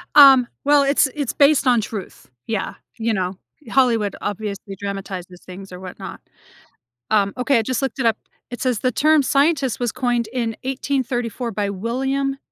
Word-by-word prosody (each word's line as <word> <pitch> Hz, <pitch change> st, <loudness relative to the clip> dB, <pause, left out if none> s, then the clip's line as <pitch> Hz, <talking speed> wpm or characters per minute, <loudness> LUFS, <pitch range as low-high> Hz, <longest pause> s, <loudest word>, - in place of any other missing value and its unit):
Um, 270 Hz, -4 st, +9 dB, 0.2 s
well, 290 Hz, 0 st, +5 dB
it's 280 Hz, 0 st, +3 dB
it's 285 Hz, -5 st, -2 dB
based 285 Hz, -2 st, +4 dB
on 240 Hz, -3 st, +4 dB
truth, 210 Hz, -2 st, -8 dB, 0.2 s
yeah. 220 Hz, -4 st, -2 dB, 0.2 s
You 225 Hz, 0 st, 0 dB
know, 185 Hz, -2 st, -2 dB, 0.3 s
Hollywood, 230 Hz, -6 st, +2 dB
obviously, 200 Hz, -1 st, -5 dB
dramatizes 190 Hz, -2 st, -6 dB
things, 190 Hz, +1 st, -10 dB
or 180 Hz, -, -8 dB
whatnot. 185 Hz, -1 st, -9 dB, 0.9 s
Um, 200 Hz, -2 st, +2 dB
okay, 250 Hz, -1 st, +2 dB
I -, -, +2 dB
just 255 Hz, +3 st, -2 dB
looked 270 Hz, 0 st, -3 dB
it 245 Hz, -, 0 dB
up. 225 Hz, -, +3 dB, 0.3 s
It 245 Hz, -, -6 dB
says, 250 Hz, -5 st, 0 dB
"The 255 Hz, -, +1 dB
term 305 Hz, +3 st, +3 dB
scientist 280 Hz, -2 st, +2 dB
was 240 Hz, -3 st, 0 dB
coined 240 Hz, -2 st, 0 dB
in 230 Hz, -3 st, -2 dB
1834 255 Hz, -3 st, -2 dB
by 205 Hz, -1 st, -2 dB
William 265 Hz, +7 st, -2 dB
240 Hz, 165 wpm, -21 LUFS, 205-270 Hz, 0.9 s, Um